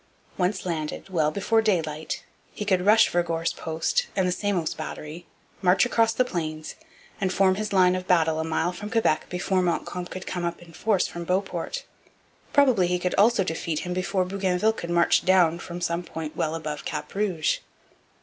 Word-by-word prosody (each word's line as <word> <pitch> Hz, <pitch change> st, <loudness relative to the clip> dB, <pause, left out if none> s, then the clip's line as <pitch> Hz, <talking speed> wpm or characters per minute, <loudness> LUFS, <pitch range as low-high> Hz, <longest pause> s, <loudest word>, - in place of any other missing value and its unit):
Once 185 Hz, +2 st, -1 dB
landed, 160 Hz, +1 st, -4 dB
well 160 Hz, -5 st, +2 dB
before 205 Hz, +6 st, +1 dB
daylight, 160 Hz, -7 st, -1 dB, 0.3 s
he 210 Hz, -, -4 dB
could 185 Hz, -3 st, +2 dB
rush 220 Hz, +1 st, +7 dB
Vergor's 165 Hz, -1 st, 0 dB
post 175 Hz, -, -1 dB
and 190 Hz, -2 st, +2 dB
the -, -, +1 dB
Samos 185 Hz, -4 st, -1 dB
battery, 155 Hz, +2 st, -7 dB, 0.3 s
march 185 Hz, +3 st, +4 dB
across 230 Hz, -2 st, +3 dB
the 250 Hz, +3 st, +1 dB
Plains, 155 Hz, -7 st, -4 dB, 0.5 s
and 190 Hz, -1 st, +1 dB
form 190 Hz, 0 st, +4 dB
his 210 Hz, +2 st, -3 dB
line 185 Hz, -2 st, +5 dB
of 185 Hz, 0 st, -5 dB
battle 160 Hz, -3 st, +3 dB
a -, -, 0 dB
mile 160 Hz, +2 st, 0 dB
from 205 Hz, +4 st, -7 dB
Quebec 220 Hz, -9 st, +1 dB
before 185 Hz, +1 st, 0 dB
Montcalm 180 Hz, 0 st, -2 dB
could 185 Hz, +1 st, -7 dB
come 180 Hz, -1 st, -3 dB
up 170 Hz, 0 st, -2 dB
in 170 Hz, -1 st, -15 dB
force 200 Hz, +2 st, +1 dB
from 170 Hz, -, -6 dB
Beauport. 185 Hz, -, -2 dB, 0.7 s
Probably 255 Hz, -11 st, +4 dB
he 180 Hz, 0 st, +1 dB
could 180 Hz, 0 st, -2 dB
also 215 Hz, 0 st, +4 dB
defeat 160 Hz, -2 st, -2 dB
him 180 Hz, -, -3 dB
before 185 Hz, +1 st, 0 dB
Bougainville 195 Hz, +2 st, +1 dB
could 170 Hz, -5 st, -7 dB
march 170 Hz, 0 st, +3 dB
down 175 Hz, -3 st, +4 dB
from 175 Hz, 0 st, -7 dB
some 170 Hz, 0 st, 0 dB
point 160 Hz, -3 st, -7 dB
well 160 Hz, +1 st, -1 dB
above 155 Hz, -2 st, -5 dB
Cap 150 Hz, -1 st, -5 dB
Rouge. 190 Hz, -6 st, 0 dB
180 Hz, 180 wpm, -25 LUFS, 165-195 Hz, 0.7 s, rush